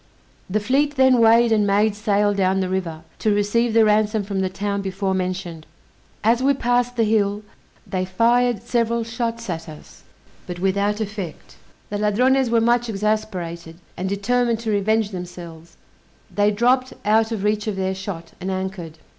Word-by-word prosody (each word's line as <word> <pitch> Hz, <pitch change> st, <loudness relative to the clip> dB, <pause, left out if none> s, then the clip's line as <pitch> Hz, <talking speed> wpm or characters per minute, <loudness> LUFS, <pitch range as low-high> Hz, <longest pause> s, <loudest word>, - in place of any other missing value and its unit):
The 210 Hz, +3 st, +1 dB
fleet 280 Hz, +7 st, +1 dB
then 260 Hz, -2 st, +4 dB
weighed 230 Hz, +1 st, +5 dB
and 210 Hz, -2 st, +3 dB
made 205 Hz, +2 st, +2 dB
sail 205 Hz, -1 st, +1 dB
down 190 Hz, -1 st, +1 dB
the 185 Hz, -1 st, -1 dB
river, 170 Hz, -4 st, -3 dB, 0.2 s
to 215 Hz, -2 st, +1 dB
receive 220 Hz, +3 st, +1 dB
the 225 Hz, -1 st, +6 dB
ransom 215 Hz, 0 st, +2 dB
from 200 Hz, -1 st, -3 dB
the 190 Hz, -1 st, 0 dB
town 200 Hz, +1 st, -3 dB
before 195 Hz, 0 st, -2 dB
mentioned. 180 Hz, -4 st, -4 dB, 0.6 s
As 230 Hz, +3 st, +3 dB
we 275 Hz, +1 st, +3 dB
passed 245 Hz, -1 st, 0 dB
the 230 Hz, -, +2 dB
hill, 210 Hz, -1 st, +1 dB, 0.4 s
they 185 Hz, -2 st, -2 dB
fired 230 Hz, +3 st, +2 dB
several 235 Hz, -1 st, 0 dB
shots 230 Hz, 0 st, -4 dB
at 165 Hz, -2 st, -5 dB
us, 155 Hz, -, -13 dB, 0.5 s
but 180 Hz, -, -5 dB
without 200 Hz, +3 st, 0 dB
effect. 200 Hz, -6 st, -6 dB, 0.4 s
The 205 Hz, -, -2 dB
Ladrones 250 Hz, +5 st, +2 dB
were 230 Hz, 0 st, +3 dB
much 240 Hz, +1 st, +2 dB
exasperated, 190 Hz, -6 st, -3 dB, 0.2 s
and 185 Hz, +1 st, -3 dB
determined 230 Hz, +3 st, 0 dB
to 225 Hz, -2 st, -2 dB
revenge 215 Hz, +1 st, +1 dB
themselves; 170 Hz, -2 st, -9 dB, 0.6 s
they 205 Hz, 0 st, +3 dB
dropped 250 Hz, +5 st, +1 dB
out 220 Hz, +2 st, +3 dB
of 215 Hz, -4 st, -3 dB
reach 210 Hz, +1 st, 0 dB
of 210 Hz, -, -1 dB
their 190 Hz, 0 st, -1 dB
shot, 190 Hz, -3 st, -7 dB
and 185 Hz, -, -3 dB
anchored. 185 Hz, -4 st, -5 dB
210 Hz, 165 wpm, -21 LUFS, 190-230 Hz, 0.6 s, the